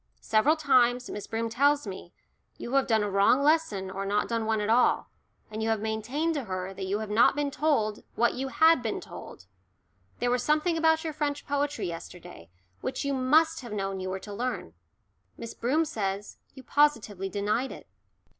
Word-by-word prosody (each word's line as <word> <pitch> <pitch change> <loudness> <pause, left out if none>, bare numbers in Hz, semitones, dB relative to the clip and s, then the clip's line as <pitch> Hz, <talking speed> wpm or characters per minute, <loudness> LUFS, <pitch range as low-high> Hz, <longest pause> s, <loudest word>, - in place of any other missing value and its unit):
Several 225 +9 +3
times, 250 -5 +2
Miss 205 - -6
Broom 225 +1 -2
tells 285 +5 +2
me, 185 -3 -8 0.5
you 235 - -7
have 275 -1 +3
done 220 -3 +2
a 205 - -1
wrong 200 +8 +4
lesson 285 -12 +1
or 195 +1 -4
not 205 +1 0
done 230 -1 -2
one 220 -1 +1
at 210 - -1
all, 235 +3 +2 0.4
and 215 +1 -5
you 220 - 0
have 220 -1 +1
maintained 220 +10 -2
to 285 -5 -3
her 185 -1 -4
that 190 0 -5
you 200 +2 0
had 215 -1 -5
not 225 +5 +5
been 290 -1 -1
told 225 -9 0
what 235 +1 +2
you 265 +2 -3
had 320 +1 +4
been 225 -2 -2
told 95 - -11 0.7
there 245 0 0
was 250 0 +1
something 305 +5 +1
about 320 0 +3
your 320 -2 -3
French 290 -1 -2
poetry 285 +1 -1
yesterday, 170 - -9 0.3
which 265 - -4
you 280 - 0
must 315 +5 +3
have 240 -4 -8
known 195 -2 -3
you 185 0 -4
were 190 - -3
to 205 +2 -9
learn. 235 - -4 0.6
Miss 230 - -7
Broom 290 +8 +1
says 200 -6 -4 0.2
you 265 - -11
positively 230 -10 +1
denied 210 +6 -1
it." - - -11
235 Hz, 190 wpm, -28 LUFS, 205-285 Hz, 0.7 s, not